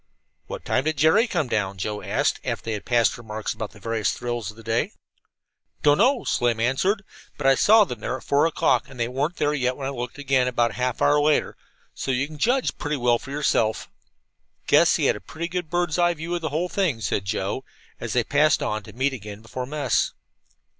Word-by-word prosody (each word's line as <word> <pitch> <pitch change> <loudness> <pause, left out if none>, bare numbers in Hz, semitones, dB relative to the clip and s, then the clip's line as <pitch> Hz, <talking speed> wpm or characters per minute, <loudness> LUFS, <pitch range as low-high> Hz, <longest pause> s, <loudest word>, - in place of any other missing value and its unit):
"What - - -7
time 130 - +1
did 155 -1 0
Jerry 160 - +4
come 170 - -1
down?" 100 -4 -1
Joe 105 +2 -3
asked, - - 0
after - - -3
they 115 - -2
had 105 -3 -5
passed 120 0 +2
remarks 110 -2 -4
about 110 -2 -5
the 100 - -17
various 110 0 -1
thrills 120 -4 -4
of 105 - -11
the 115 - -12
day. 115 +1 -1 0.9
"Don't 145 +2 +5
know," 255 +3 +3
Slim 120 -2 +1
answered, 185 - +1 0.3
"but 145 - -5
I 135 - +7
saw 215 +10 +6
them 125 - -6
there 130 - -3
at - - -14
four 145 +3 +3
o'clock, 165 - +1
and 125 - -12
they 115 - +1
weren't 140 +7 -2
there 145 - +1 0.2
when 135 - -6
I 135 - -2
looked 125 0 -5
again, 135 -3 +1
about 120 -2 +1
half 125 +2 -2
an - - +5
hour 145 0 +4
later, 150 0 +2 0.4
so - - -5
you 130 +1 +1
can 150 0 -11
judge 250 - +1
pretty 150 0 -2
well 120 -2 +2
for 135 - -11
yourself." 135 -6 0 0.7
"Guess - - +5
he - - 0
had - - +3
a - - -7
pretty 170 +2 -5
good 180 -2 -4
bird's 175 -1 0
eye 175 0 +3
view 165 +2 -5
of 175 - -1
the 160 - -2
whole 160 +5 -1
thing," 175 - 0
said 100 -1 -1
Joe, 100 +5 -2 0.4
as 120 - -4
they 125 - +2
passed 145 +5 +3
on, 105 0 -2
to - - -13
meet 135 +3 0
again 105 -2 -8
before 125 +3 -5
mess. 150 +1 0
130 Hz, 220 wpm, -24 LUFS, 115-155 Hz, 0.9 s, I